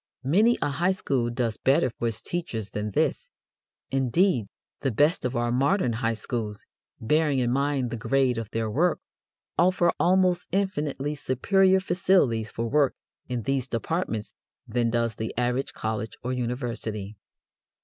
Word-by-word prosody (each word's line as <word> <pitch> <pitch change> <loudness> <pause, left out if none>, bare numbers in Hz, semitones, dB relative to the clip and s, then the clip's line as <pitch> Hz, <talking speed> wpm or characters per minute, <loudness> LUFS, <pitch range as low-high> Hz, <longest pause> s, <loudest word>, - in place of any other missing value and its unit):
Many 210 - +4
a - - +1
high 175 +6 +1
school 130 -10 -1
does 120 -2 -1
better 130 -2 +2
for 120 - -3
its 115 -2 -4
teachers 115 - -4
than 105 0 -3
this; 100 - 0 0.6
indeed, 135 - +2 0.3
the 135 - 0
best 145 +8 +2
of 125 +1 -1
our 120 0 0
modern 135 - +2
high 115 0 0
schools, 110 -2 -4 0.3
bearing 150 +4 +2
in 120 -2 +1
mind 135 -2 0
the 120 - -3
grade 125 +1 +1
of 110 -2 -6
their 115 -1 -2
work, 155 +11 +1 0.6
offer 175 0 +4
almost 180 0 +3
infinitely 150 -7 -1
superior 190 +8 +3
facilities 175 - +2
for 115 0 -3
work 140 +2 +2 0.3
in 125 -2 -2
these 135 0 0
departments 115 - -2 0.3
than 120 0 +1
does 115 -1 0
the 110 +1 -5
average 125 +2 0
college 110 0 -4
or 125 +1 -2
university. 115 -4 -3
125 Hz, 150 wpm, -26 LUFS, 115-155 Hz, 0.6 s, Many